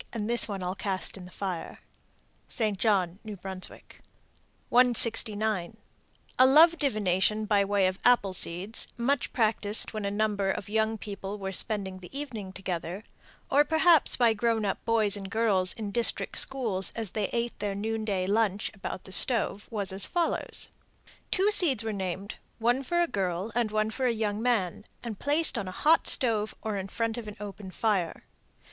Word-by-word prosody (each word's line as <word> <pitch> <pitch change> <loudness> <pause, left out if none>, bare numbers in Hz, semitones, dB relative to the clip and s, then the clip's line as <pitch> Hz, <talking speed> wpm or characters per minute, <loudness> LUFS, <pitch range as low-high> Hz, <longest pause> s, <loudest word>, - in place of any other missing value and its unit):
And 215 -3 -3
this 240 +1 +5
one 195 -3 -5
I'll 180 +1 -2
cast 190 -2 -3
in 190 -2 -10
the - - -12
fire. 185 -4 -5 0.7
St. 215 -3 -2
John, 190 -3 0
N.B. 215 -2 -7
169. 215 +1 0 0.6
A 255 - +8
love 325 +5 +6
divination 215 - +1
by 205 -1 +2
way 200 -1 +1
of 185 +1 -1
apple 235 -6 +3
seeds, 185 +4 -2
much 250 +2 -1
practiced 215 -2 +2
when 215 -1 -4
a 200 - -1
number 205 -1 -1
of 195 - -3
young 220 +1 0
people 200 -1 -7
were 195 -1 -5
spending 195 -2 -1
the 180 - -12
evening 225 -10 -6
together, 185 0 -5 0.5
or 290 +2 +5
perhaps 320 +1 +4
by 235 -3 +4
grown 225 0 0
up 195 - -3
boys 220 -3 +3
and 195 -1 -5
girls 200 -4 +1
in 210 -3 -6
district 235 +2 0
schools 220 -9 +1
as 225 -5 -4
they 210 -3 -2
ate 235 0 -3
their 205 -1 -3
noon 220 +2 -3
day 195 -4 -1
lunch 205 0 0
about 190 -1 -7
the 190 - -12
stove, 215 -1 +4
was 200 -4 -3
as 190 0 +2
follows: 345 -1 -2 0.6
Two 400 +2 +2
seeds 310 - +5
were 220 -1 -3
named, 190 +1 -5 0.2
one 240 +3 +1
for 345 +6 -1
a - - +3
girl 190 - -3
and 235 -2 0
one 215 +1 -1
for 255 +3 -1
a - - +2
young 215 -2 -2
man, 220 -7 0 0.2
and 225 -4 -6
placed 295 +3 +1
on 200 - -5
a - - -5
hot 315 - +2
stove 220 -5 +1
or 215 -2 -3
in 190 0 -5
front 230 +3 -3
of 225 - -9
an 210 - -8
open 205 -1 -8
fire. 185 -3 -1
215 Hz, 175 wpm, -27 LUFS, 195-235 Hz, 0.7 s, A